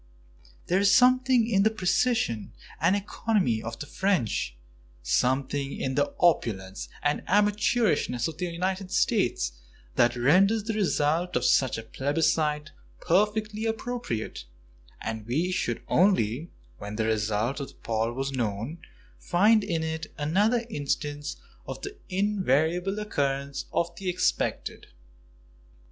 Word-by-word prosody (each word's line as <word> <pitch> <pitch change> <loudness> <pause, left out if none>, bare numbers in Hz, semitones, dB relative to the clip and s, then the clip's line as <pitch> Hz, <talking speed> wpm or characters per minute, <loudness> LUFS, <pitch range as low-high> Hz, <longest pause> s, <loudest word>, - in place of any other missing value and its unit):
There 185 - +2
is 200 0 +4
something 255 0 +5
in 200 -4 +3
the 215 - +5
precision 185 - 0 0.3
and 170 +5 +3
economy 200 - 0
of 115 0 -6
the 145 - -6
French, 150 - -1 0.5
something 135 - 0
in 130 - -1
the 145 +1 0
opulence 100 - +1
and 145 0 +1
amateurishness 205 - +2
of 160 -1 -8
the 180 - -1
United 185 +2 -2
States - - +1 0.5
that 120 0 +4
renders 190 - +4
the 220 +1 -2
result 175 -4 +1
of 125 - +1
such 130 -3 +3
a 115 - -6
plebiscite 150 +4 0 0.3
perfectly 210 +4 +1
appropriate, 225 - -4 0.5
and 110 -1 -5
we 160 +10 0
should 185 - -2
only, 165 - +2 0.3
when 105 +1 -6
the 110 0 0
result 110 +4 0
of 140 - -4
the - - -15
poll 115 0 -1
was 135 +3 -3
known, 120 +5 -3 0.4
find 210 +5 +4
in 165 -5 -1
it 160 0 -4
another 205 +11 +2
instance 145 - -3 0.3
of - - -5
the 400 +1 -6
invariable 185 -1 +1
occurrence 140 -9 -2
of 170 0 -1
the 190 0 -3
expected. 180 +1 -1
160 Hz, 125 wpm, -27 LUFS, 130-200 Hz, 0.5 s, something